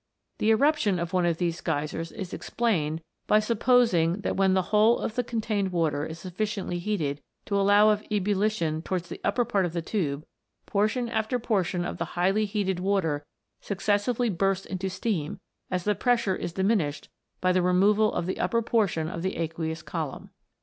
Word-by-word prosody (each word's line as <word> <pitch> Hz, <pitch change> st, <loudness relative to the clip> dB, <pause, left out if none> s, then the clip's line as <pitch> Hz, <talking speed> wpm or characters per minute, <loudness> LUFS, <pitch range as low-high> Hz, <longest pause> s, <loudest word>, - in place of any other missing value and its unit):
The 215 Hz, -, +2 dB
eruption 225 Hz, -4 st, +3 dB
of 170 Hz, +1 st, -4 dB
one 180 Hz, -2 st, +2 dB
of 165 Hz, -2 st, +1 dB
these 170 Hz, -1 st, -1 dB
Geysers 155 Hz, +3 st, -2 dB
is 195 Hz, -5 st, -7 dB
explained 165 Hz, -9 st, -1 dB, 0.2 s
by 210 Hz, -, +5 dB
supposing 215 Hz, -6 st, +3 dB
that -, -, -1 dB
when 190 Hz, -1 st, +3 dB
the 185 Hz, -, +2 dB
whole 215 Hz, +3 st, +5 dB
of -, -, -3 dB
the 245 Hz, -, 0 dB
contained 215 Hz, -4 st, -1 dB
water 155 Hz, -4 st, 0 dB
is 160 Hz, -, -7 dB
sufficiently 185 Hz, 0 st, -3 dB
heated 165 Hz, -7 st, -2 dB, 0.2 s
to 200 Hz, -, -2 dB
allow 205 Hz, +2 st, +5 dB
of 210 Hz, 0 st, -1 dB
ebullition 200 Hz, -5 st, 0 dB
towards 175 Hz, 0 st, -3 dB
the -, -, -8 dB
upper 235 Hz, +4 st, +1 dB
part 205 Hz, -4 st, +1 dB
of 175 Hz, -2 st, -2 dB
the 170 Hz, -, -1 dB
tube, 155 Hz, -7 st, -2 dB, 0.4 s
portion 215 Hz, +4 st, 0 dB
after 225 Hz, +2 st, -1 dB
portion 185 Hz, -7 st, 0 dB
of 175 Hz, -, -5 dB
the 170 Hz, +1 st, -5 dB
highly 195 Hz, +5 st, +2 dB
heated 195 Hz, -3 st, -1 dB
water 180 Hz, -6 st, 0 dB, 0.4 s
successively 210 Hz, +4 st, 0 dB
bursts 195 Hz, +1 st, 0 dB
into 190 Hz, 0 st, -3 dB
steam 185 Hz, -5 st, -2 dB, 0.3 s
as 180 Hz, -1 st, -1 dB
the 210 Hz, -, +2 dB
pressure 235 Hz, -4 st, +1 dB
is 175 Hz, -, -4 dB
diminished 190 Hz, -7 st, 0 dB, 0.3 s
by 185 Hz, -, +2 dB
the 185 Hz, 0 st, +3 dB
removal 200 Hz, +4 st, +3 dB
of -, -, -2 dB
the 185 Hz, -, -3 dB
upper 230 Hz, 0 st, +1 dB
portion 200 Hz, -9 st, +1 dB
of 165 Hz, 0 st, -5 dB
the 190 Hz, +2 st, -2 dB
aqueous 160 Hz, -1 st, -3 dB
column. 160 Hz, -5 st, -5 dB
190 Hz, 175 wpm, -27 LUFS, 170-215 Hz, 0.4 s, by